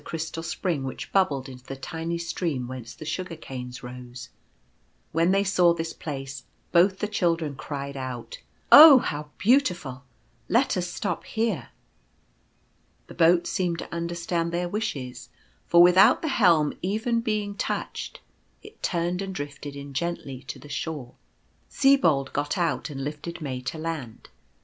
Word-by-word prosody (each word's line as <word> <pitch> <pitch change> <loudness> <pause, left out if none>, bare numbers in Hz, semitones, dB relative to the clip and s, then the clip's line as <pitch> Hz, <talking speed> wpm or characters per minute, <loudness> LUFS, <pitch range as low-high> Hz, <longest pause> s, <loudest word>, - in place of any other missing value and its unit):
crystal 165 0 -4
spring 165 -2 -2
which 130 - -6
bubbled 145 -9 +2
into 125 -1 -11
the 135 - -6
tiny 160 +5 -4
stream 165 -6 -3
whence 125 -2 -8
the 155 - -9
Sugar 180 +2 -4
canes 130 -5 -8
rose. 125 +1 -9 0.8
When 165 +2 +2
they 195 +1 +3
saw 180 -3 +4
this 165 0 -4
place 135 -3 -6 0.3
both 185 +2 +4
the 210 - -2
children 165 -7 0
cried 140 0 -6
out, 130 -3 -6 0.2
" - - -37
Oh, 300 -2 +12
how 150 -10 -3
beautiful! 180 - +1 0.5
Let 245 +4 +3
us 180 -1 -1
stop 210 - -3
here." 220 - -2 1.4
The - - -12
boat 170 +1 +4
seemed 175 -3 -1
to - - -7
understand 170 0 -2
their 175 +1 -1
wishes, 140 - -4 0.4
for 170 0 +7
with 180 +1 +5
out 220 - +6
the 315 - 0
helm 160 - +4
even 220 +5 0
being 215 -3 -1
touched, 200 - -4 0.4
it 435 +1 -14
turned 175 +1 -1
and 195 -1 -5
drifted 145 -1 -6
in 140 0 -8
gently 135 -3 -3
to 135 - -6
the 135 +3 -13
shore. 145 -4 -5 0.6
Sibold 170 - +3
got 145 +6 -1
out 160 -7 0
and 135 -2 -5
lifted 150 +4 -6
May 130 -5 -4
to 135 +5 -5
land. 155 -8 -6
165 Hz, 155 wpm, -26 LUFS, 135-180 Hz, 1.4 s, Oh